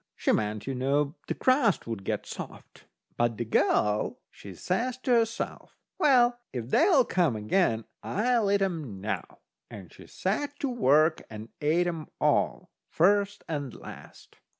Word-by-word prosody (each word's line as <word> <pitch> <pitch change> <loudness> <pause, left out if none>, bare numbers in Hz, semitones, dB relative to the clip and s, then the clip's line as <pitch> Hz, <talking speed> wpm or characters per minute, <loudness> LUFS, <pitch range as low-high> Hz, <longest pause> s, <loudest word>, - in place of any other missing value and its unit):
She - - +1
meant, 105 -1 -1
you 135 - -3
know, 140 +3 0
the - - -2
crust 255 -6 +2
would 115 -4 -5
get - - -3
soft. - - -10 0.3
But 120 -2 +1
the 120 - -2
girl, 105 -1 +1
she 100 -2 -11
says 235 - -2
to 255 - 0
herself: 230 -1 -1 0.2
"Well, 245 -6 +4
if 120 0 -6
they'll 320 -7 +5
come 170 - +1
again, 110 - +1 0.2
I'll 225 0 +1
eat 200 0 +3
'em 155 - -3
now." 100 -2 -5 0.3
And 95 -4 -11
she - - -14
set 285 +10 -2
to 280 - 0
work 155 - +3
and 110 +1 -9
ate 160 +4 +2
'em 165 -3 -4
all, - - +1 0.2
first 200 +3 +2
and 145 -5 -4
last. - - -13
160 Hz, 150 wpm, -28 LUFS, -, 0.3 s, they'll